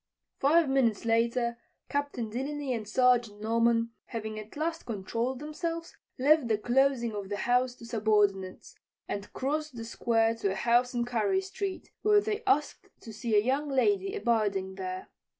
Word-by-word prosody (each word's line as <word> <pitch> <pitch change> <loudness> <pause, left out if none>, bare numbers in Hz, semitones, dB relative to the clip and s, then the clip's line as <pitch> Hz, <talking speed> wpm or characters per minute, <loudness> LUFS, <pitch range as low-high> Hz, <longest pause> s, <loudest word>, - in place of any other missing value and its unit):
Five 315 +3 +4
minutes 245 -6 +1
later 235 +1 +1 0.3
Captain 285 -6 -2
Delany 275 +2 -3
and 220 -3 -4
Sergeant 240 -3 +3
Norman, 230 +1 +2
having 220 -2 -5
at 215 +6 -10
last 325 +2 -2
controlled 230 +4 -2
themselves, 330 +3 -5 0.2
left 290 0 +4
the 220 -2 +2
closing 240 0 +2
of 200 -2 -5
the 205 - -2
house 245 +3 +1
to 235 - -12
subordinates 210 -4 0 0.3
and 200 0 -5
crossed 300 +1 -2
the 230 -1 -6
square 225 -1 +1
to 200 -4 0
a - - -5
house 245 +3 +2
on 240 0 +1
Carey 245 - +1
street, 385 0 -5
where 420 -1 +5
they 420 +1 -2
asked 300 -7 +1
to 225 - -9
see 225 0 -1
a 205 - +5
young 280 +3 0
lady 390 +9 +1
abiding 205 - 0
there. 185 -1 -6
240 Hz, 160 wpm, -29 LUFS, 220-285 Hz, 0.3 s, where